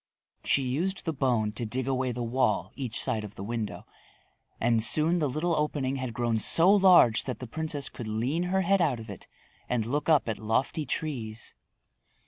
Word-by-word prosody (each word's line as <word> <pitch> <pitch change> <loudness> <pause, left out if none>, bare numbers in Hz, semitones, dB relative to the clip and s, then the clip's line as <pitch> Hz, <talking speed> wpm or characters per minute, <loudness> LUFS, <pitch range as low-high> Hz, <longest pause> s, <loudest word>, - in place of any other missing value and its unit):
She 140 - +1
used 170 +10 -2
the 160 - -1
bone 125 -6 0
to 120 - -5
dig 125 +3 0
away 130 -1 0
the 120 0 -4
wall 115 -6 0
each 125 -5 -3
side 110 - -1
of 105 -1 -9
the 95 - -7
window 110 0 -5 0.7
and 115 -1 +2
soon 160 +8 +4
the 150 -3 0
little 160 +6 -1
opening 145 -3 -1
had 130 -2 -4
grown 120 -2 0
so 170 - +4
large 185 - +5
that 125 - -4
the 130 - -7
princess 150 +3 -3
could 120 - -8
lean 120 +10 -1
her 190 +2 +1
head 195 +1 +2
out 145 -8 +1
of 110 -2 -9
it 100 - -11 0.4
and 120 -3 0
look 145 +7 -2
up 155 -6 +4
at 110 - -3
lofty 130 +7 -1
trees. 115 -7 -4
130 Hz, 190 wpm, -27 LUFS, 115-155 Hz, 0.7 s, large